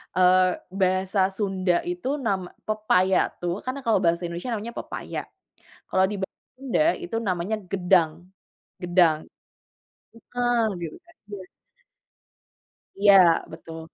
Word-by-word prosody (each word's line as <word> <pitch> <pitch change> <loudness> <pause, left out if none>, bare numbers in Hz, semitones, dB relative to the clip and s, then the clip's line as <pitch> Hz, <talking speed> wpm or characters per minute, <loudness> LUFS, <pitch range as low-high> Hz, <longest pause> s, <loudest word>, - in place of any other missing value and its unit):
eee, 185 0 +5 0.2
bahasa 190 0 +1
Sunda 190 -4 0
itu 355 -6 -4 0.2
nama 190 -4 0 0.2
pepaya 215 -3 +2 0.2
tuh, 175 +2 -2
karena 255 +2 -3
kalau 225 -4 +3
bahasa 170 +1 +2
Indonesia 175 +8 -4
namanya 225 +2 -5
pepaya. - - -6 0.7
Kalau 190 - +3
di 210 - -3
bahasa 190 - -6 0.2
Sunda, 270 +1 -1 0.2
itu 345 -10 -4
namanya 185 +4 -1
gedang. 180 -4 +3 0.7
Gedang. 175 -3 +3 1.0
Heeh 240 0 -1 0.2
gitu 165 - -6
kan 340 -1 -22
iya. 190 -3 -8 1.5
Iya, 195 -5 +6
betul. 165 0 -9
190 Hz, 115 wpm, -25 LUFS, 180-220 Hz, 1.5 s, Iya